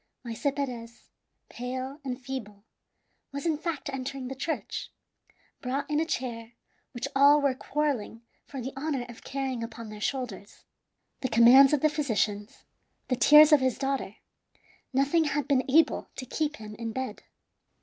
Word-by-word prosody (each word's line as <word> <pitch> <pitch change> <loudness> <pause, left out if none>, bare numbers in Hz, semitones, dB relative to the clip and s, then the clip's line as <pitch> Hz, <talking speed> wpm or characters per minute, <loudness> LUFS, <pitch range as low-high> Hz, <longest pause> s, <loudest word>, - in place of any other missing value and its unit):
Maese 235 +3 -4
Perez, 240 -4 -6 0.4
pale 260 +3 -5
and 255 -2 -4
feeble, 235 -7 -7 0.7
was 280 +3 -5
in 325 -2 +2
fact 305 -3 -4
entering 265 -1 -4
the - - -4
church, 315 +5 -4 0.7
brought 270 +3 -2
in 300 - +2
a 320 - +1
chair 235 -5 -4 0.4
which 240 +2 -4
all 285 +2 +7
were 280 -2 +2
quarrelling 260 -5 -2 0.2
for 275 - -8
the 260 +2 -5
honor 270 -3 -2
of 235 - -12
carrying 265 -3 -3
upon 230 -1 -8
their 210 0 -9
shoulders. 230 -5 -4 0.5
The 260 - -2
commands 245 +4 +8
of 295 -3 +2
the 310 - +5
physicians, 220 -8 -2 0.4
the 255 - +2
tears 300 +5 +8
of 300 - +7
his 260 -2 0
daughter 270 -6 -2 0.8
nothing 285 +5 +2
had 290 -2 -1
been 270 -2 +1
able 320 +5 +3
to 255 - -6
keep 305 +4 -2
him 215 -4 -9
in 230 -1 -4
bed. 260 +1 -4
265 Hz, 155 wpm, -28 LUFS, 235-285 Hz, 0.8 s, commands